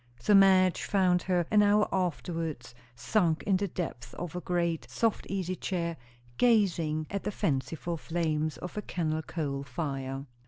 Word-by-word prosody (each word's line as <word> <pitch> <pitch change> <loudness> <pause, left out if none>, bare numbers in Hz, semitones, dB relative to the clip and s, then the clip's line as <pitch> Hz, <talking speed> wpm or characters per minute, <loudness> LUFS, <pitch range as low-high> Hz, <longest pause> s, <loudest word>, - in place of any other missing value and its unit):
So 205 - +2
Madge 190 -2 +6
found 185 -3 +2
her 180 -2 +1
an 210 -1 +6
hour 210 +1 +4
afterwards, 165 -8 -2 0.2
sunk 170 - +1
in 195 -2 +2
the 200 +1 -1
depths 125 -10 -5
of 175 -1 -6
a 180 - -3
great, 170 -7 -1
soft 225 - 0
easy 185 -2 -2
chair, 170 -3 -2 0.4
gazing 175 -10 +2
at 200 -1 -2
the - - -1
fanciful 160 0 -2
flames 155 -2 -1
of 180 - -7
a 210 - -2
kennel 160 -5 -2
coal 145 -4 -3
fire. 135 0 -4
170 Hz, 155 wpm, -29 LUFS, 155-190 Hz, 0.4 s, Madge